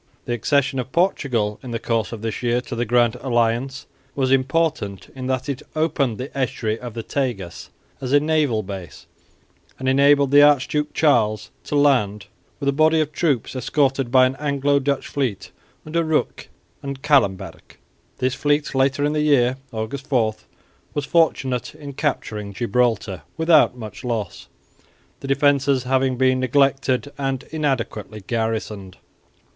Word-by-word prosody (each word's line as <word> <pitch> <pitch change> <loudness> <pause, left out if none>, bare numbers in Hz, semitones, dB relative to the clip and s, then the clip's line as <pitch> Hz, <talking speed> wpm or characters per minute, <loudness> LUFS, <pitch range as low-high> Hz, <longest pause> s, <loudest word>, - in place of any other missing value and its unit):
The 120 - -2
accession 135 +3 +1
of 130 +1 -5
Portugal 125 - 0
in 130 - -9
the 115 - -2
course 115 -2 -1
of 115 -2 -7
this 110 -1 -3
year 120 0 +1
to 125 - -7
the 120 +1 -1
Grand 120 +1 +2
Alliance 120 +1 -1 0.3
was 130 -2 0
important 135 - 0
in 130 -1 -6
that 130 0 -1
it 140 -2 -3
opened 145 -7 0
the 130 +3 -7
estuary 115 -4 -1
of 120 -2 -8
the 115 - -4
Tagus 120 -12 -4 0.3
as 130 -1 -4
a 145 - +6
naval 150 -7 +1
base, 95 -6 -8 0.7
and 130 - -4
enabled 140 +1 +4
the 145 0 +7
Archduke 150 +1 +3
Charles 110 -8 +2
to - - -3
land 120 -9 +2 0.3
with 140 - -3
a - - +4
body 155 +3 +3
of 155 -1 0
troops 145 -8 -1
escorted 135 0 0
by 130 0 +6
an 130 +1 -1
Anglo 140 -1 +1
Dutch 140 0 -1
fleet 130 -8 -3 0.3
under 165 +2 0
Rooke 160 -1 -1 0.3
and 140 -1 -6
Callenberg. 130 -11 0 0.4
This 130 0 0
fleet 145 +1 0
later 135 +2 +2
in 150 - 0
the 150 - 0
year 130 -4 +3
(August 115 +5 -5
4) 115 -6 +1 0.6
was 145 - -1
fortunate 135 -7 +1
in 145 -2 -9
capturing 105 -8 -3
Gibraltar 110 -4 0 0.2
without 160 -6 +4
much 110 -3 -9
loss, 115 -4 -4 0.7
the - - -7
defences 140 -1 +2
having 130 0 +1
been 130 0 +3
neglected 135 +1 +1
and 135 -1 -2
inadequately 125 -8 -2
garrisoned. 110 -4 -3
130 Hz, 150 wpm, -22 LUFS, 115-145 Hz, 0.7 s, the